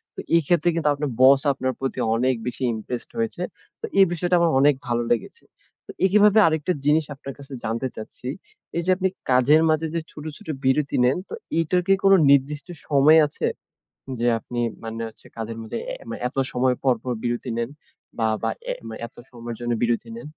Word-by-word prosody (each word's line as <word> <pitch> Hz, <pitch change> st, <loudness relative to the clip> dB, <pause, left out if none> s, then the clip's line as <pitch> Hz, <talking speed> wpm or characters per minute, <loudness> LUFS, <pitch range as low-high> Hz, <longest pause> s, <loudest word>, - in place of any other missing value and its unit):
তো, -, -, -8 dB, 0.2 s
এই 165 Hz, -, +5 dB
ক্ষেত্রে 175 Hz, -1 st, +3 dB
কিন্তু, 160 Hz, -3 st, 0 dB
আপনার 145 Hz, 0 st, -3 dB
বস 135 Hz, +1 st, +8 dB
আপনার 130 Hz, -1 st, -2 dB
প্রতি, 135 Hz, -1 st, -3 dB, 0.2 s
অনেক 130 Hz, +2 st, +2 dB
বেশি 125 Hz, +2 st, -4 dB
ইমপ্রেসড 115 Hz, +3 st, -6 dB
হয়েছে। 225 Hz, -6 st, -2 dB, 0.4 s
তো, -, -, -2 dB
এই 195 Hz, -, +9 dB
বিষয়টা 175 Hz, +1 st, +1 dB
আমার 170 Hz, -1 st, +3 dB
অনেক 145 Hz, +1 st, +5 dB
ভালো 120 Hz, 0 st, 0 dB
লেগেছে। 115 Hz, -, -2 dB, 0.4 s
তো -, -, -7 dB
একই 200 Hz, +2 st, +4 dB
ভাবে 210 Hz, +1 st, +6 dB
আরেকটা 160 Hz, +2 st, 0 dB
জিনিস 150 Hz, +1 st, +3 dB
আপনার 135 Hz, 0 st, -8 dB
কাছে 140 Hz, 0 st, -13 dB
জানতে 115 Hz, +4 st, -2 dB
চাচ্ছি। 110 Hz, +3 st, -9 dB, 0.5 s
এই -, -, +1 dB
যে -, -, -2 dB
আপনি, 190 Hz, 0 st, +1 dB, 0.2 s
কাজের 135 Hz, +5 st, +5 dB
মাঝে 155 Hz, +1 st, +2 dB
যে -, -, +1 dB
ছোট, 150 Hz, -, -10 dB
ছোট 215 Hz, -, -17 dB, 0.2 s
বিরতি 140 Hz, +2 st, +2 dB
নেন, 130 Hz, +6 st, +3 dB
তো -, -, -10 dB, 0.3 s
এটার 180 Hz, +3 st, +1 dB
কি 195 Hz, -, +6 dB
কোনো 195 Hz, 0 st, +7 dB
নির্দিষ্ট 140 Hz, +3 st, +2 dB, 0.2 s
সময় 150 Hz, +2 st, +6 dB
আছে, -, -, -3 dB, 0.7 s
যে 120 Hz, -, 0 dB
আপনি 120 Hz, +1 st, -5 dB, 0.2 s
মানে 115 Hz, 0 st, -5 dB
হচ্ছে -, -, -18 dB
কাজের 115 Hz, 0 st, -5 dB
মাঝে 110 Hz, -, -6 dB, 0.2 s
এ -, -, -4 dB, 0.3 s
এত 130 Hz, -, -17 dB, 0.2 s
সময় 125 Hz, 0 st, +2 dB
পর, 130 Hz, -2 st, +4 dB
পর, 125 Hz, -, -2 dB
বিরতি 120 Hz, +1 st, -2 dB
নেন 115 Hz, +2 st, -2 dB, 0.5 s
বা, 110 Hz, -, +2 dB, 0.2 s
বা 115 Hz, -, +1 dB, 0.6 s
এত -, -, -19 dB, 0.2 s
সময়ের 120 Hz, -1 st, -7 dB
জন্য 120 Hz, 0 st, -1 dB
বিরতি 120 Hz, -, 0 dB
নেন? -, -, -9 dB
135 Hz, 190 wpm, -23 LUFS, 120-160 Hz, 0.7 s, এই